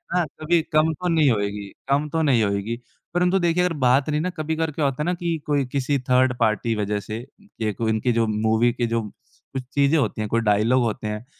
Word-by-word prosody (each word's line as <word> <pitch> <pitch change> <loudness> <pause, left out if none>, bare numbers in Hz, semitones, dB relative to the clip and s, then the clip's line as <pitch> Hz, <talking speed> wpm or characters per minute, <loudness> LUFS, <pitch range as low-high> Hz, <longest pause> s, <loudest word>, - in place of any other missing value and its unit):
है - - +4
ना 175 - +1 0.2
कभी 170 +1 +3
कम 155 +1 +4
तो 180 +3 -4
नहीं 160 -5 +4
होएगी 100 -1 -2 0.2
कम 145 +2 +2
तो 160 +1 0
नहीं 130 -7 +3
होएगी। 100 +4 -2 0.3
परंतु 180 +2 +2
देखिए 175 +1 +2
अगर 180 -2 +1
बात 135 +1 +2
रहीं 150 0 0
ना 180 - -1
कभी-कभार 160 -1 -2
क्या 145 0 -1
होता 135 +1 -1
है - - -3
ना 180 - +1
कि 170 -2 -2
कोई 145 -3 +1
किसी 140 +1 0
थर्ड 125 0 +4
पार्टी 115 0 +1
वज़ह 105 0 -1
से, 110 +4 -6 0.4
ये 110 -2 0
को 115 +2 -3
इनकी 110 +3 +1
जो 115 -1 +1
मूवी 110 +2 +2
के 120 -1 -1
जो 115 0 0 0.5
कुछ 130 -1 -3
चीज़ें 140 +2 +3
होती 135 -6 0
हैं, 105 - -2
कोई 115 0 +1
डायलॉग 110 +4 +3
होते 110 -1 -2
हैं 105 +2 -5
130 Hz, 230 wpm, -23 LUFS, 110-155 Hz, 0.5 s, है